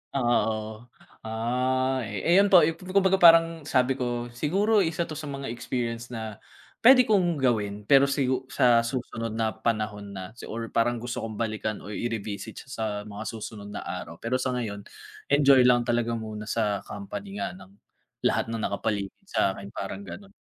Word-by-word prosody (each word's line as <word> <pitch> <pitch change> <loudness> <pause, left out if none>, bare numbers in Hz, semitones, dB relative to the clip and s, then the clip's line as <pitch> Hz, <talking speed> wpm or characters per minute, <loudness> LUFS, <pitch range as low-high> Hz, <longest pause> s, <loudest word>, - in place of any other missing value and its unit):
Oo, 110 -2 0 0.4
ah. 130 +3 0
Eh 105 -3 -5
eh, 170 - +3
yun 200 - +5
po 180 -5 +7
yung 160 +1 0
kumbaga 190 +1 +2
parang 165 -2 +6
sabi 130 -1 +2
ko 120 -1 -2
siguro 195 - +2
isa 165 -2 +1
'to 155 -2 -6
sa 150 - -6
mga 140 -3 -5
experience 120 -1 -3
na 110 -3 -6 0.4
pwede 255 +2 +8
kong 190 -7 +2
gawin, 105 -7 0
pero 135 +5 +5
sigu 130 -2 0
sa 120 -2 +4
susunod 115 -3 -4
na 110 -1 0
panahon 105 -3 -3
na 95 +1 -7 0.2
or 115 0 -5
parang 120 +1 +2
gusto 120 +1 -4
kong 110 -1 -5
balikan 110 -1 -3
o 105 - -8
i-revisit 110 -1 -4
siya 135 - -21
sa 110 - -4 0.2
mga 105 0 -7
susunod 110 -2 -7
na 105 - -6
araw. 85 - -6
Pero 115 +8 -2
sa 130 0 -1
ngayon 105 -4 -4 0.4
enjoy 140 -3 +6
lang 120 -1 +4
talaga 120 -1 0
muna 110 -1 -6
sa 105 -3 0
company 200 0 -7
nga - - -3
ng 100 - -14 0.5
lahat - - +1
ng 115 - -2
nakapaligid 100 -1 -2
sa'kin, 100 - -1
parang - - -5
ganon. 195 0 -10
120 Hz, 170 wpm, -26 LUFS, 110-140 Hz, 0.5 s, pwede